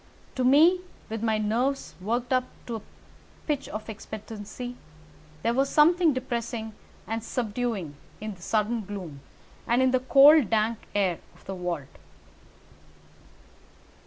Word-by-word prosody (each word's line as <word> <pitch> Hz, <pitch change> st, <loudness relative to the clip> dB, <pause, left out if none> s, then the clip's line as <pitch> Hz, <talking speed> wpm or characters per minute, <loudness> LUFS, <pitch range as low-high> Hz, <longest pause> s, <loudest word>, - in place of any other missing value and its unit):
To 255 Hz, -, -1 dB
me, 315 Hz, +8 st, +6 dB, 0.3 s
with 225 Hz, 0 st, -4 dB
my 220 Hz, -1 st, +1 dB
nerves 235 Hz, +6 st, 0 dB
worked 240 Hz, +5 st, -1 dB
up 255 Hz, 0 st, +2 dB, 0.2 s
to 235 Hz, -2 st, -3 dB
a -, -, -10 dB, 0.6 s
pitch 290 Hz, -3 st, -2 dB
of 215 Hz, 0 st, -6 dB
expectancy, 220 Hz, +2 st, -7 dB, 0.7 s
there 230 Hz, -, +2 dB
was 270 Hz, +2 st, +2 dB
something 335 Hz, +2 st, +5 dB
depressing 235 Hz, -3 st, -3 dB, 0.3 s
and 225 Hz, 0 st, -3 dB
subduing 225 Hz, -, -2 dB, 0.2 s
in 215 Hz, 0 st, -5 dB
the 180 Hz, -, -17 dB
sudden 220 Hz, +4 st, 0 dB
gloom, 185 Hz, -8 st, -7 dB, 0.5 s
and 235 Hz, +1 st, +3 dB
in 260 Hz, 0 st, +4 dB
the 255 Hz, -, +3 dB
cold 275 Hz, 0 st, +7 dB
dank 220 Hz, 0 st, +1 dB, 0.2 s
air 190 Hz, -4 st, +1 dB, 0.2 s
of -, -, -21 dB
the 195 Hz, -, -5 dB
vault. 175 Hz, -6 st, -5 dB
230 Hz, 130 wpm, -27 LUFS, 210-255 Hz, 0.7 s, cold